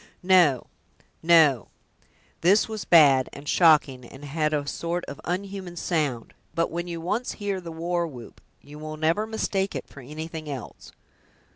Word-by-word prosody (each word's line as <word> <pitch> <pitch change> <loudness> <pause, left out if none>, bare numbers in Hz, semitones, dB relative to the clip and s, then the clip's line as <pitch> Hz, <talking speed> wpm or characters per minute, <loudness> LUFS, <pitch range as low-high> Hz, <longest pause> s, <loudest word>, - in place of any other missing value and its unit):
"No, 175 -9 +4 0.6
no; 160 - +4 0.7
this 195 +5 +4
was 220 -3 -6
bad, 140 -6 +6
and 140 +1 -11
shocking, 150 -7 +4
and 135 +4 -12
had 155 +1 -1
a 145 -2 -1
sort 170 +4 -3
of 140 - -9
unhuman 185 0 -4
sound; 150 -9 -2 0.2
but 165 - 0
when 175 +1 -4
you 170 -1 -5
once 210 +9 -2
hear 200 -3 -3
the 170 -1 -8
war 170 +1 -2
whoop, 125 -6 -12 0.2
you 150 +1 -13
will 155 0 -7
never 165 +8 0
mistake 200 -3 -2
it - - -4
for - - -14
anything 155 +3 -7
else. 135 -4 -8
165 Hz, 155 wpm, -25 LUFS, 145-180 Hz, 0.7 s, bad